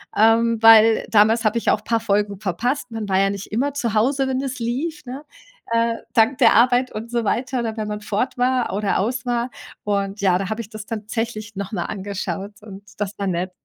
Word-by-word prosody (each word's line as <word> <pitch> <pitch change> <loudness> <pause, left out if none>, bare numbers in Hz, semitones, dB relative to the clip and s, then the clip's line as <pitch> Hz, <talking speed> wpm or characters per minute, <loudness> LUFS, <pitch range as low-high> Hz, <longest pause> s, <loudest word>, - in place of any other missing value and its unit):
ähm, 225 +1 +3
weil 225 0 +7
damals 220 +2 +4
habe 215 +2 +2
ich - - 0
auch 210 - 0
paar 230 0 0
Folgen 205 -2 -1
verpasst. 240 - -2
Man 220 -2 -5
war 190 - +2
ja 195 0 +3
nicht 200 -1 -7
immer 270 +6 0
zu 235 -7 -2
Hause, 270 +5 +2
wenn 260 0 -1
es 270 -1 -5
lief, 285 +7 -3
ne, 260 +4 -7 0.5
äh, 230 0 +2 0.2
dank 230 +4 +3
der 255 - +6
Arbeit 245 +2 +3
und 225 +2 -6
so 235 -1 0
weiter 255 +4 -1
oder 225 -2 -3
wenn 215 -1 -3
man 210 0 -5
fort 220 +5 -2
war 250 -4 +1
oder 205 -1 0
aus 245 +6 -2
war. 240 0 -1 0.3
Und 200 0 -2
ja, 185 -2 +3
da 195 +1 -4
habe 220 +2 -3
ich 215 - -11
das 215 -2 -9
tatsächlich 215 -1 -5
noch 195 +1 -5
mal 175 -5 -2
angeschaut 200 0 -5
und 200 -2 -11 0.2
das 205 0 -3
war 200 - -1
nett. 180 0 -2
220 Hz, 215 wpm, -21 LUFS, 205-240 Hz, 0.5 s, weil